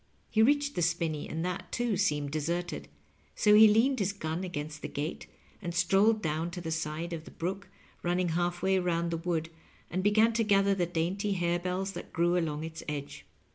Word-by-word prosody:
He 220 - +3
reached 285 +4 +3
the - - -2
spinney, 165 -2 -1
and 165 +2 -3
that, 180 -1 -4
too, 240 -3 0
seemed 150 -7 0
deserted; 170 +3 -2 0.5
so 210 - +4
he 215 +1 +9
leaned 235 +5 +3
his 200 0 0
gun 160 -2 -3
against 155 -4 -5
the - - -4
gate 150 +3 -4 0.3
and 175 -3 -4
strolled 200 +5 +3
down 160 +1 -1
to 175 - -6
the 165 -2 -5
side 160 +2 -3
of 160 -2 -5
the - - -10
brook 190 +3 -4 0.3
ranning 175 0 0
halfway 175 +3 +1
round 170 -1 0
the 165 - -1
wood, 165 -1 -2 0.4
and 185 - 0
began 215 +3 +4
to 230 0 +2
gather 200 -2 +3
the 180 -3 0
dainty 180 +5 -1
harebells 180 +2 -1
that - - -8
grew 175 +1 +2
along 155 -3 -1
its 160 0 -6
edge. 145 -1 -6
175 Hz, 190 wpm, -30 LUFS, 165-195 Hz, 0.5 s, he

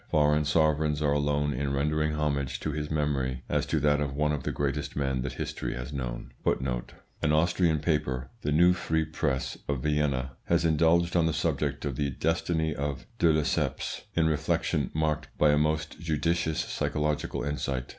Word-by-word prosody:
Foreign 75 0 +3
sovereigns 75 -1 +2
are 75 -2 +2
alone 75 0 +1
in 70 +2 -2
rendering 75 +2 +1
homage 70 -3 -1
to 75 - -2
his 75 0 -3
memory 70 -4 -1
as - - 0
to 80 - +1
that 75 0 +3
of 70 -2 -2
one 75 +1 +1
of 75 - -1
the - - -2
greatest 70 +1 -2
men 65 -3 0
that 65 0 -3
history - - -4
has 65 +3 -6
known. - - -4 0.9
An 75 - +2
Austrian 85 +1 +3
paper, 75 -5 -1
the 75 - -1
Neue 85 +4 +6
Freie 80 -2 0
Presse, 75 -3 -2
of 70 -3 -2
Vienna, 75 -4 0
has 85 0 +2
indulged 85 +2 +3
on 85 -2 +4
the 80 - 0
subject - - -1
of 70 -4 -3
the 70 -1 0
destiny 80 +2 0
of 70 -2 -3
de 85 - +5
Lesseps 75 -1 -1
in 80 - +3
reflections 75 -2 0
marked 75 -1 0
by 75 - +5
a 75 - +3
most 75 0 -1
judicious 80 0 0
psychological 75 -1 -1
insight. 70 -3 -2
75 Hz, 175 wpm, -28 LUFS, 70-80 Hz, 0.9 s, Neue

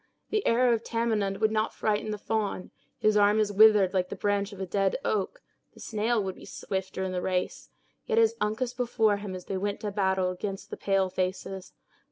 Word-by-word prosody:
The 430 -1 +1
arrow 240 +1 +4
of 230 0 -1
Tamenund 220 -4 0
would 220 0 +2
not 220 0 0
frighten 215 0 -1
the 210 - -2
fawn; 205 -3 -2 0.3
his 215 0 +2
arm 205 +1 +4
is 210 -1 +1
withered 205 -2 +6
like 185 -1 0
the - - -5
branch 205 0 0
of 200 - -10
a 190 - -2
dead 195 +1 0
oak; 215 - -1 0.3
the - - -15
snail 220 0 0
would 190 -1 -3
be - - -15
swifter 190 0 -4
in 190 - -2
the 180 -1 -2
race; 180 0 -2 0.4
yet 455 - 0
is 455 -1 +5
Uncas 230 +4 -1
before 230 -4 +1
him 200 -2 -6
as 180 - -8
they 195 - -3
went 200 +1 -2
to 210 - -3
battle 190 -2 +1
against 195 +2 -6
the - - -3
pale 195 -2 +1
faces! 185 +1 -3
205 Hz, 210 wpm, -28 LUFS, 190-220 Hz, 0.4 s, withered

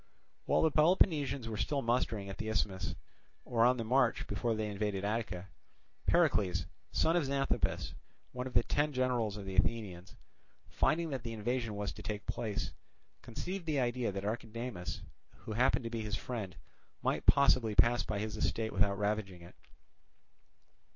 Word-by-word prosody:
While - - +3
the 160 - +4
Peloponnesians 150 - +3
were 110 -1 -4
still 140 +6 0
mustering 115 -4 0
at 95 - -7
the 110 - -3
Isthmus, 100 -3 -1 0.5
or 115 -1 +2
on 125 +1 +5
the 115 - -2
march 125 +1 +2
before 110 +3 -1
they 110 0 -1
invaded 100 -1 -2
Attica, 105 -4 -2 0.6
Pericles, 90 -3 +3 0.3
son 165 - +2
of 170 -4 +2
Xanthippus, 140 0 0 0.4
one 125 +1 -4
of 130 - -10
the - - +5
ten 145 +1 +1
generals 125 -5 0
of 100 - -7
the 95 -1 -5
Athenians, 95 -2 -1 0.5
finding 165 +1 +1
that 135 -3 -2
the 115 -1 -5
invasion 115 0 -2
was 100 0 -2
to - - -10
take 105 -1 -4
place, 110 -4 -3 0.5
conceived 175 +9 -5
the 150 -3 +1
idea 120 -2 0
that 100 +1 -4
Archidamus, 110 -4 -4 0.4
who - - -7
happened 125 +3 +2
to 115 - -4
be 115 -1 -2
his 105 -1 -2
friend, 105 -7 -5 0.5
might - - 0
possibly 130 -6 +5
pass 120 +2 +5
by 105 - -3
his 105 +1 -3
estate 110 -1 -1
without 100 +1 +2
ravaging 100 -3 -2
it. 85 - -13
115 Hz, 165 wpm, -33 LUFS, 100-125 Hz, 0.6 s, on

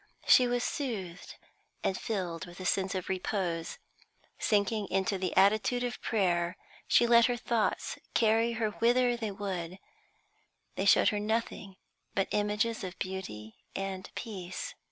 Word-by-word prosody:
She 250 - +7
was 245 0 0
soothed 200 - -4 0.5
and 190 - +1
filled 180 -6 -3
with 175 +1 -12
a 185 - -6
sense 190 +1 +1
of 185 - -3
repose. 185 -3 -2 0.6
Sinking 210 0 +1
into 195 +1 0
the 185 -2 -2
attitude 215 +5 +4
of 245 0 -4
prayer, 175 -5 +1 0.3
she 240 - +5
let 235 0 +6
her 245 -1 -1
thoughts 230 -1 -1 0.2
carry 225 +1 +3
her 225 -2 -1
whither 245 +3 +3
they 225 -2 -3
would; 190 -3 -4 1.0
they - - -2
showed - - +6
her 210 - -1
nothing 210 -2 -2 0.4
but 195 - +1
images 210 +2 0
of 185 0 -6
beauty 110 - -6 0.2
and 195 -1 -4
peace. 195 - -5
200 Hz, 140 wpm, -30 LUFS, 185-230 Hz, 1.0 s, She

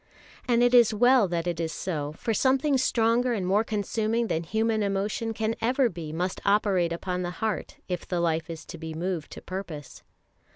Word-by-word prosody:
And 240 -1 +3
it 245 0 +3
is 235 -3 +6
well 245 -1 +5
that 170 -1 -2
it 175 -2 -2
is 165 -1 -1
so, 150 -3 -3
for 225 +8 -2
something 270 +5 +2
stronger 240 -1 +2
and 200 -5 -2
more 200 +4 +3
consuming 220 +2 -1
than 160 - 0
human 220 +5 0
emotion 205 +3 -1
can 220 0 -1
ever 255 +2 +2
be 165 -5 -7
must 180 +4 -2
operate 200 -4 +2
upon 180 +2 -3
the 175 - -2
heart 220 -2 -3
if 180 -2 -4
the 180 - -1
life 165 -1 0
is 165 -2 -7
to 170 - -9
be 160 -1 -6
moved 170 -1 -3
to - - -10
purpose. 175 -7 -7
200 Hz, 195 wpm, -27 LUFS, 170-225 Hz, -, is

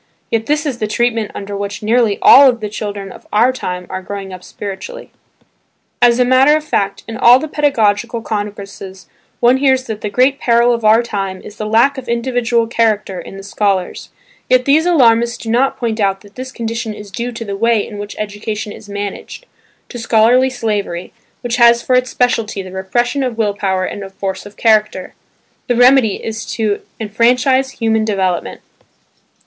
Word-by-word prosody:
Yet 225 -1 -1
this 300 +1 0
is 265 -5 -3
the 215 - -1
treatment 225 0 0
under 200 0 -6
which 200 +1 -5
nearly 225 -1 +2
all 275 -1 +8
the 215 -3 -6
children 205 -2 -6
of - - -14
our 235 +5 +3
time 180 -7 -5
are 185 - -5
growing 195 0 -7
up 180 0 -10
spiritually. 200 +1 -8 0.9
As 240 -1 +5
a 250 - +3
matter 260 +4 +5
of 310 - -6
fact 200 -10 -2
in 225 0 -6
all 240 +3 +7
the 310 - -4
pedagogical 230 -6 0
congresses 200 -3 -6 0.3
one 245 +2 +4
hears 265 -1 +2
that 220 -4 -6
the 210 - -3
great 260 +5 +2
peril 235 0 +3
of 230 -1 -3
our 220 +2 +5
time 195 -4 -4
is 210 - -12
the 215 - -4
lack 235 +6 +3
of 245 -2 -10
individual 235 -1 0
character 215 -5 0
in 195 - -11
the 195 - -9
scholars; 200 -2 -2 0.4
yet 255 0 +3
these 310 +4 +3
alarmists 235 -7 +3
do 225 - -5
not 255 +4 +1
point 230 -2 -3
out 195 -2 0
that 205 0 -18
this 260 +1 -7
condition 230 -2 -4
is 205 -1 -11
due 235 +5 -4
to 230 0 -6
the 200 -1 -4
way 230 0 +1
in 205 -2 -9
which 205 0 -7
education 210 0 -5
is 205 - -12
managed, 205 - -6 0.4
to 245 - -7
scholastic 235 +3 +3
slavery, 205 -7 -3 0.3
which 240 -1 -2
has 235 -1 +5
for 255 - 0
its 250 0 +1
specialty 230 -5 -1
the 185 - -10
repression 240 +9 -1
of 250 -3 -2
will 210 -3 0
power 190 -2 -1
and 205 - -6
of 195 0 -11
force 195 0 -4
of 205 - -16
character. 215 -4 +1 0.5
The 245 - +1
remedy 245 -3 +5
is 225 0 -6
simply 215 -3 -2
to - - -26 0.2
enfranchise 250 +5 +2
human 220 -1 0
development. 190 -5 -2
225 Hz, 185 wpm, -16 LUFS, 205-245 Hz, 0.9 s, all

